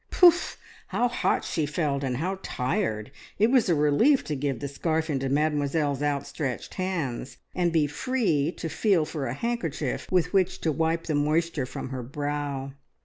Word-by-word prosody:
Poof 355 0 +5 0.3
how 245 - +1
hot 245 - 0
she 155 -4 -1
felt, 145 -2 -1
and 125 -2 -1
how 185 +6 -2
tired! 115 - -2 0.3
It 220 +4 +4
was 255 -7 +4
a 170 - +4
relief 150 - +4
to 150 - -3
give 135 -3 -2
the 140 - -3
scarf 160 +3 -1
into 135 -1 -1
Mademoiselle's 145 0 +1
outstretched 140 -2 -2
hands, 140 -9 -3 0.2
and 175 -1 +1
be 160 -3 +3
free 165 - 0
to - - -5
feel 170 0 +2
for 150 -3 -4
a 120 - -3
handkerchief 165 - -2
with 180 0 +2
which 190 -2 +2
to 160 - +1
wipe 165 +2 0
the 155 - -2
moisture 150 -1 +1
from - - -6
her 130 -1 -4
brow. 145 +1 -3
150 Hz, 170 wpm, -27 LUFS, 140-175 Hz, 0.3 s, Poof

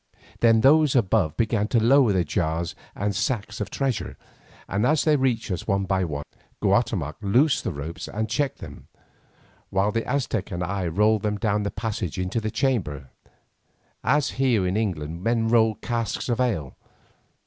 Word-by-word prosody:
Then 115 -1 +5
those 150 +2 +5
above 100 -8 +2
began 110 -2 +1
to 115 - +2
lower 125 +1 +5
the 95 -2 +2
jars 85 +1 -1 0.2
and 100 0 -2
sacks 105 -2 -2
of 105 - -3
treasure, 135 -4 -2 0.5
and 100 +2 -1
as 150 +4 +3
they 155 -1 +4
reached 125 -6 0
us 90 - -4
one 100 0 +1
by 95 0 0
one, 75 -3 -4 0.4
Guatemoc 75 +2 +1
loosed 125 +9 +2
the - - -2
ropes 75 +2 -6
and 110 +2 -3
checked 140 +1 -1
them, - - -11 0.8
while 95 +2 +1
the 115 +1 -1
Aztec 125 -7 -1
and 90 -3 -3
I 95 0 -2
rolled 105 +5 +2
them 105 0 -1
down 105 0 0
the 100 - -2
passage 105 -6 -4
into 95 +5 -2
the 110 - -2
chamber, 105 - -1 0.9
as 150 0 +2
here 120 -8 +3
in 90 +1 -1
England 85 -7 -2
men 115 +2 +1
roll 110 -1 +4
a - - -17
cask 115 -2 -2
of 120 0 0
ale. 100 - -1
105 Hz, 170 wpm, -24 LUFS, 95-120 Hz, 0.9 s, Then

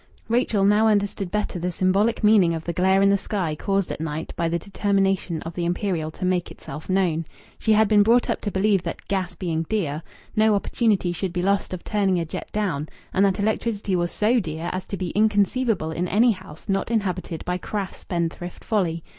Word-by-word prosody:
Rachel 225 -4 +2
now 210 +2 +4
understood 205 -3 +1
better 210 -2 -2
the 180 +2 -1
symbolic 195 +6 +1
meaning 200 -6 +5
of 160 - -5
the 170 - -3
glare 190 +3 +3
in 200 - +5
the 200 - +3
sky 185 -8 -2
caused 195 +4 -1
at - - -5
night 160 0 -4
by 170 -1 0
the 170 - 0
determination 195 -2 0
of 165 - -6
the 175 - -3
Imperial 175 -2 -1
to 170 - -5
make 180 -1 0
itself 150 +6 -9
known. 180 -4 +1 0.4
She 220 - +3
had 215 0 +5
been 210 0 +5
brought 235 +4 +4
up - - -1
to 205 - -2
believe 195 0 +2
that, 170 -1 -6
gas 190 -3 -2
being 165 -4 -2
dear, 160 -9 -1 0.3
no 215 -1 +4
opportunity 200 -3 +1
should 180 +1 -3
be 180 0 -1
lost 200 +1 +1
of 185 -2 -5
turning 195 -4 +1
a 165 - -1
jet 155 - -6
down, 180 -8 -1 0.2
and 195 - +3
that 195 -1 +1
electricity 210 -1 0
was 175 -1 0
so 230 +4 +2
dear 165 -2 -4
as 185 0 -4
to 200 - -4
be 180 -2 -3
inconceivable 210 -3 +1
in 175 +3 -2
any 230 +6 +4
house 185 -6 -9
not 195 +1 0
inhabited 185 -7 -2
by 180 0 -1
crass 200 0 -4
spendthrift 175 0 -4
folly. 170 -7 0
190 Hz, 205 wpm, -24 LUFS, 170-210 Hz, 0.4 s, meaning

